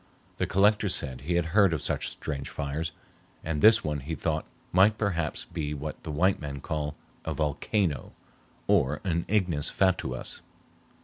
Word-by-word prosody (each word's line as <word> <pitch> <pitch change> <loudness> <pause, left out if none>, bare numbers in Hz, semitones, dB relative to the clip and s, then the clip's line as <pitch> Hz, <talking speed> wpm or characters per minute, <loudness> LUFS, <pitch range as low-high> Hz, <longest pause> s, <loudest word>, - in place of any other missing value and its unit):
The - - 0
Collector 105 +2 +3
said 65 -7 -1
he 85 +6 -1
had 85 -1 0
heard 100 -4 +5
of 75 - -1
such - - -1
strange 70 -3 -5
fires, 75 +3 -3 0.5
and 75 -2 -2
this 110 +1 +7
one 75 -1 -1
he 80 +5 -4
thought 80 -1 -1 0.2
might 100 +4 +5
perhaps 85 -7 -1
be 75 -4 -3
what 75 +2 -6
the - - -7
white 90 +6 +2
man 70 -2 -5
called 75 -1 -3 0.3
a - - -3
"volcano, 75 - 0 0.5
or 70 +3 +3
an 85 -3 0
ignis 90 -8 +1
fatuus." 90 -10 0
80 Hz, 160 wpm, -28 LUFS, 75-95 Hz, 0.5 s, this